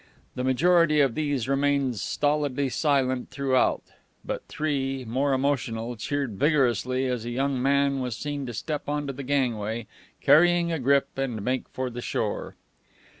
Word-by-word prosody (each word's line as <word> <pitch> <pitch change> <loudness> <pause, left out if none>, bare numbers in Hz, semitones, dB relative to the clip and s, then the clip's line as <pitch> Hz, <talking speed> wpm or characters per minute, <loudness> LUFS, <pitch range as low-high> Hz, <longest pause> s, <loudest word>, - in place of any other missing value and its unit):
The 125 - -3
majority 155 +4 +4
of 135 -5 +3
these 145 -5 -1
remained 140 -2 +1
stolidly 145 +1 0
silent 130 -3 0
throughout, 135 -2 +1 0.4
but - - -3
three, 135 -4 -2
more 135 +5 0
emotional, 125 -4 -1
cheered 130 -2 -3
vigorously 130 - +2
as 125 -3 -2
a 120 - -5
young 135 +1 -1
man 140 +1 +2
was 125 -4 -3
seen 145 -2 -4
to 120 - -5
step 150 +7 -4
on 145 0 -1
to 140 - -4
the 135 - -7
gangway, 120 -5 -1 0.3
carrying 175 +1 +4
a 165 - -1
grip, 140 +2 +3
and 125 -5 -2
make 130 +1 -1
for 130 -1 -4
the 120 +1 -6
shore. - - -3
135 Hz, 155 wpm, -26 LUFS, 125-145 Hz, 0.4 s, majority